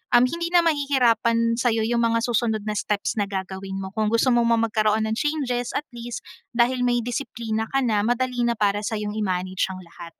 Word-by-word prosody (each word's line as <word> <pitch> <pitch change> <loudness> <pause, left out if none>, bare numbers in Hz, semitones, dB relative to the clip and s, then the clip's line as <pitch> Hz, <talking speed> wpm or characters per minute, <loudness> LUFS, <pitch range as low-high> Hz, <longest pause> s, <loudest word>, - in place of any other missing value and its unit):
um, 240 - +7
hindi 335 +7 -1
na 345 0 +4
mahihirapan 235 -6 +2
sa’yo 225 -2 +2
yung 235 +1 +1
mga 230 0 +1
susunod 230 -3 0
na 215 - -2
steps 210 +1 -1
na 205 - 0
gagawin 190 0 -5
mo. 190 0 -5
Kung 215 +1 0
gusto 230 +4 +3
mo 240 -1 +3
magkaroon 220 -2 +2
ng 220 - -1
changes, 265 -5 -1
at 295 - 0
least, 240 0 -7 0.3
dahil 250 +1 +2
may 240 -1 +1
disiplina 225 -3 -3
ka 270 -1 0
na, 215 -4 +2
madali 245 +3 0
na 235 - +1
para 205 -1 +1
sa'yong 210 0 -3
i-manage 185 -2 -1
ang 185 -1 -8
lahat. 170 0 -12
230 Hz, 195 wpm, -24 LUFS, 210-245 Hz, 0.3 s, um